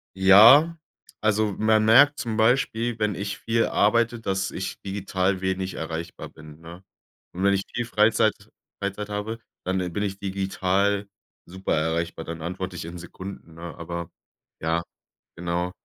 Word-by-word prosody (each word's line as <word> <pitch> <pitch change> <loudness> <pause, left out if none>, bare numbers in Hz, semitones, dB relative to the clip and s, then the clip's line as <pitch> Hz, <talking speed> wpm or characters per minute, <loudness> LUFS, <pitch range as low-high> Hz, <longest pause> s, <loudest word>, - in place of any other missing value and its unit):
Ja, 115 - +7 0.4
also 110 -1 +1
man 110 0 +3
merkt 140 +6 +6
zum 115 -2 -3
Beispiel, 115 0 +1
wenn 105 -1 +1
ich 100 +1 -4
viel 115 +3 +1
arbeite, 115 +3 +2
dass 95 -3 -2
ich 95 - -5
digital 95 -1 -1
wenig 95 0 -2
erreichbar 80 +1 -6
bin, 75 0 -14
ne? 85 +3 -12 0.5
Und 90 +2 -4
wenn 100 0 +4
ich 95 0 0
viel 120 - -2
Freizeit 110 -1 +3 0.5
Freizeit 100 +1 -3
habe, 105 +3 -4 0.2
dann 95 +1 -1 0.2
bin 105 - -1
ich 95 -1 -3
digital 100 +1 0 0.4
super 95 0 -2
erreichbar, 80 +1 -2
dann 80 -1 -6
antworte 90 +2 -5
ich 85 - -6
in 85 +2 -7
Sekunden, 85 -1 -10
ne? 85 0 -8
Aber 85 0 -6 0.5
ja, 80 +1 0 0.5
genau. 85 +1 -2
95 Hz, 150 wpm, -25 LUFS, 85-110 Hz, 0.5 s, Ja